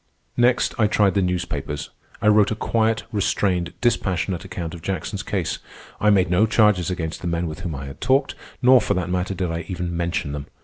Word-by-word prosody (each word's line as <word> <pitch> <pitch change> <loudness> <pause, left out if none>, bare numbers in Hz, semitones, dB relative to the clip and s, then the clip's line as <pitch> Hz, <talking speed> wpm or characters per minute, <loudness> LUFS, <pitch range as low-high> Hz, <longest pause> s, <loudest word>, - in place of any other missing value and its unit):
Next 120 +1 +3
I 110 - +5
tried 105 -2 +3
the 100 - +2
newspapers. 85 -5 -3 0.3
I - - +3
wrote 105 -1 +5
a 110 - -1
quiet, 110 0 0
restrained, 95 -4 0
dispassionate 95 -6 0
account 90 -3 -5
of 85 - -8
Jackson's 95 +2 -3
case. 100 -5 -2 0.4
I 105 - +3
made 95 -4 +3
no 100 +5 +4
charges 105 -6 +3
against 80 -3 -4
the - - -4
men 85 0 -1
with 80 +1 -5
whom 85 -3 -4
I 70 0 -6
had 70 - -10
talked, 135 +2 +2 0.3
nor, 125 0 +7
for 100 -1 0
that 90 -1 -2
matter, 90 +1 -1
did 90 -2 -2
I 85 +1 -3
even 90 -2 -3
mention 85 -2 -1
them. 70 0 -5
90 Hz, 205 wpm, -22 LUFS, 85-105 Hz, 0.4 s, nor